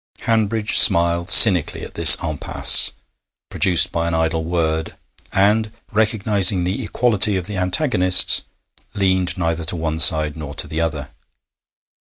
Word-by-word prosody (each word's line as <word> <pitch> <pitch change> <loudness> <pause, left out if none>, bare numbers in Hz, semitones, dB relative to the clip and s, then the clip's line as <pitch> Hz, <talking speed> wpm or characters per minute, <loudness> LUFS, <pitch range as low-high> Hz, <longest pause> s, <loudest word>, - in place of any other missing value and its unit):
Hanbridge 110 -1 -2
smiled 85 +1 +2
cynically 90 -8 +5
at - - -13
this - - +7
impasse 75 -2 +3 0.6
produced 90 -3 +1
by 85 0 -5
an 85 - -5
idle 80 0 -4
word, 80 -1 -6 0.4
and, 105 +3 -2 0.2
recognising 105 -4 0
the 95 +8 -6
equality 105 -3 -1
of 90 - -8
the 105 0 -9
antagonists, 90 - +1 0.5
leaned 95 -2 -3
neither 85 -1 -5
to 80 +3 -5
one 80 -1 -7
side 75 -2 +2
nor 75 -2 -11
to - - -1
the 80 +1 -7
other. 75 -4 -7
90 Hz, 135 wpm, -15 LUFS, 80-105 Hz, 0.6 s, this